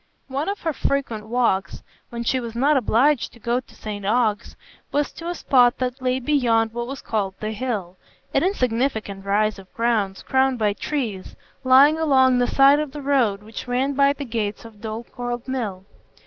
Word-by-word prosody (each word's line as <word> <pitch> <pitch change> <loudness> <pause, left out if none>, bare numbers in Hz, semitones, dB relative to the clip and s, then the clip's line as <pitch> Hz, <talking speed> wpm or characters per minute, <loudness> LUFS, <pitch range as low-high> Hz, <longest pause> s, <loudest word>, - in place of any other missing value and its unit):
One 280 +6 -2
of 405 - -4
her 320 -1 -1
frequent 240 -7 -2
walks, 230 -6 0 0.3
when 235 0 -5
she 260 +2 +1
was 235 -2 -6
not 280 +5 +3
obliged 260 +3 +2
to 235 - -16
go 235 +2 0
to 255 - -16
St 205 -2 -6
Ogg's, 215 0 0 0.4
was 290 0 0
to 335 - -8
a 350 - -3
spot 245 -6 +3
that 255 +1 -3
lay 255 0 0
beyond 235 -5 +1
what 240 0 -4
was 270 +1 -7
called 200 -4 -2
the 215 0 -3
"Hill,"—an 220 - -4
insignificant 240 - -1
rise 210 +1 +1
of 190 -1 -15
ground 220 -5 0
crowned 265 -1 +2
by 210 -2 +1
trees, 220 -7 -4 0.3
lying 275 +5 +6
along 260 -5 +4
the 245 - +2
side 275 +2 +5
of 300 -3 -4
the 295 - -6
road 240 -8 +1
which 220 +3 -8
ran 260 +3 0
by 280 0 +4
the 285 0 -6
gates 220 -3 -3
of 215 -2 -14
Dorlcote 240 +2 -5
Mill. 215 -8 -4
245 Hz, 180 wpm, -22 LUFS, 215-270 Hz, 0.4 s, lying